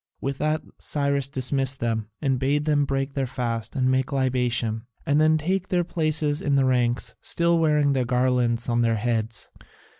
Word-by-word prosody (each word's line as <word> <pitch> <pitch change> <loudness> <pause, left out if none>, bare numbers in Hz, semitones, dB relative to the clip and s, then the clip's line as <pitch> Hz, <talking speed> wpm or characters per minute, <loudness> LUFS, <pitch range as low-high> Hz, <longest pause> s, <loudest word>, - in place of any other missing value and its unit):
With 135 0 -3
that 155 0 0 0.2
Cyrus 140 -2 0
dismissed 135 -1 0
them, 110 -2 -2
and 135 -3 +1
bade 145 +3 +1
them 145 -2 +2
break 135 0 -2
their 135 -2 -1
fast 120 -3 -3
and 130 -2 +1
make 130 0 0
libation, 125 -4 0 0.2
and 150 -1 +3
then 155 0 +4
take 185 +4 -1
their 175 -1 +1
places 155 -3 0
in 140 -1 +1
the 135 -1 +3
ranks, 120 -3 +1
still 170 0 +1
wearing 150 -3 +3
their 130 -2 +1
garlands 125 -1 +1
on 120 -1 +1
their 115 -1 +2
heads. 115 -1 -2
135 Hz, 175 wpm, -24 LUFS, 120-150 Hz, 0.2 s, then